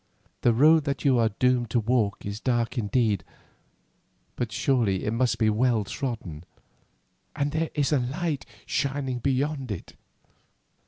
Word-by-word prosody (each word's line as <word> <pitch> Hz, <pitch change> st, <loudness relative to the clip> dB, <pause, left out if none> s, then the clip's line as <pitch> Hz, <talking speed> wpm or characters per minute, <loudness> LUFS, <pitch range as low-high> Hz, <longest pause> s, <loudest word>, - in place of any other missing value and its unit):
"The 120 Hz, -, +4 dB
road 150 Hz, +6 st, +5 dB
that 140 Hz, 0 st, -3 dB
you 130 Hz, -3 st, +4 dB
are 115 Hz, -1 st, +3 dB
doomed 125 Hz, -2 st, +2 dB
to 120 Hz, -, +2 dB
walk 110 Hz, -3 st, 0 dB
is 100 Hz, +1 st, -4 dB
dark 120 Hz, -2 st, 0 dB
indeed, 105 Hz, -4 st, +1 dB, 1.1 s
but 120 Hz, -2 st, -3 dB
surely 105 Hz, -4 st, +1 dB
it 105 Hz, -, 0 dB
must 125 Hz, +1 st, +1 dB
be 110 Hz, -, +2 dB
well 110 Hz, 0 st, +2 dB
trodden, 95 Hz, -, -5 dB, 0.9 s
and 140 Hz, +1 st, 0 dB
there 160 Hz, +1 st, -1 dB
is 145 Hz, -3 st, +1 dB
light 145 Hz, +3 st, -1 dB, 0.2 s
shining 135 Hz, -2 st, -1 dB
beyond 135 Hz, +1 st, -1 dB
it. 100 Hz, -, -7 dB
125 Hz, 140 wpm, -26 LUFS, 110-140 Hz, 1.1 s, road